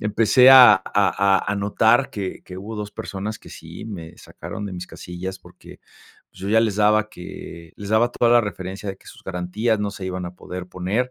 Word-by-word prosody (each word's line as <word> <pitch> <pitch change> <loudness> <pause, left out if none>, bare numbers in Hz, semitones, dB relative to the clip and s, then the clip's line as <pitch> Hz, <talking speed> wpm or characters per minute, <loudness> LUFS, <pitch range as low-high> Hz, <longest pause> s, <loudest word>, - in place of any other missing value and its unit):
empecé 115 +5 +5
a 125 -5 +10
a 95 - -2
a 100 -1 +2
a - - -1
notar 110 +5 +2
que 95 -3 -5
que 90 - -10
hubo 110 +3 -7
2 105 -1 -5
personas 105 +2 -6
que - - -15
sí - - -10
me 85 -5 -8
sacaron 105 - -8
de 95 - -7
mis 90 0 -6
casillas, 95 +1 -7
porque - - -16 0.5
yo 95 +2 -7
ya 110 +1 +4
les 110 -3 0
daba 105 0 +3
que 85 -2 -10
les 100 - -8
daba 110 +2 +3
toda 120 -1 +2
la 120 - +6
referencia 95 0 -6
de 95 - -9
que - - -23
sus - - -14
garantías 95 +5 -1
no 105 - -1
se 100 -2 -8
iban 90 -1 -4
a 85 - -9
poder 90 0 -8
poner. 100 +8 -2
100 Hz, 210 wpm, -22 LUFS, 90-110 Hz, 0.5 s, a